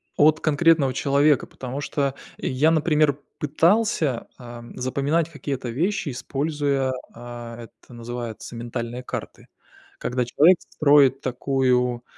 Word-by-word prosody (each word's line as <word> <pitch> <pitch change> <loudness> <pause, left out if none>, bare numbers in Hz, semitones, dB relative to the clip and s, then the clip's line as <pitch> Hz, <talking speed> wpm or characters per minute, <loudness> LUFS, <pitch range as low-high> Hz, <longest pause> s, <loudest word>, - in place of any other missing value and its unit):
от 155 +1 +4
конкретного 155 -3 +3
человека, 140 0 +2
потому 130 +2 -6
что 140 -1 -1 0.2
я, 145 +5 +1
например, 150 -2 +2 0.2
пытался, 160 - +1
ам, 120 -1 -11
запоминать 140 +6 0
какие-то 140 -5 -5
вещи, 175 - -1
используя, 140 +1 -1 0.2
а, 120 -1 -9
это 120 - -17
называется 120 -1 -7
ментальные 120 +1 -5
карты. - - -7 0.5
Когда 125 0 -1
человек 160 +9 +5
строит 140 -3 +4
такую, 125 -1 0
135 Hz, 110 wpm, -23 LUFS, 125-150 Hz, 0.5 s, человек